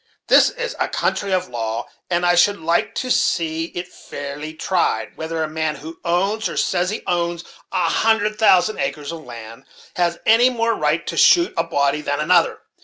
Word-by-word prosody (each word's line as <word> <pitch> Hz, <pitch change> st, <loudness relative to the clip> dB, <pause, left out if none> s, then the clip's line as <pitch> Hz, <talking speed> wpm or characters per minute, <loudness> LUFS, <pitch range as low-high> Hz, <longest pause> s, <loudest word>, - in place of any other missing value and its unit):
This -, -, +6 dB
is -, -, -5 dB
a -, -, +1 dB
country 200 Hz, -1 st, -1 dB
of 185 Hz, -1 st, 0 dB
law; 115 Hz, -1 st, -4 dB, 0.2 s
and 175 Hz, 0 st, 0 dB
I 175 Hz, -, +4 dB
should 200 Hz, +4 st, +4 dB
like 165 Hz, +1 st, 0 dB
to 255 Hz, -, -2 dB
see 165 Hz, -9 st, +1 dB
it 175 Hz, +1 st, -7 dB
fairly 145 Hz, -2 st, -8 dB
tried, 160 Hz, -11 st, -1 dB
whether 160 Hz, 0 st, -3 dB
a -, -, -2 dB
man 155 Hz, 0 st, -2 dB
who 160 Hz, +3 st, -10 dB
owns, 195 Hz, +4 st, 0 dB
or -, -, -6 dB
says 180 Hz, +1 st, +1 dB
he 215 Hz, -, -4 dB
owns, 170 Hz, -1 st, -1 dB, 0.3 s
a 170 Hz, -, +1 dB
hundred 215 Hz, +3 st, +1 dB
thousand 215 Hz, -1 st, +4 dB
acres 150 Hz, 0 st, -3 dB
of 165 Hz, -1 st, -8 dB
land, 115 Hz, 0 st, -10 dB, 0.3 s
has 170 Hz, -1 st, +1 dB
any 230 Hz, +3 st, +5 dB
more 230 Hz, -2 st, 0 dB
right -, -, 0 dB
to -, -, -4 dB
shoot 345 Hz, 0 st, +5 dB
a 165 Hz, -, +1 dB
body 140 Hz, -1 st, 0 dB
than 145 Hz, -1 st, -2 dB
another. 170 Hz, +2 st, +2 dB
170 Hz, 185 wpm, -20 LUFS, 155-200 Hz, 0.3 s, This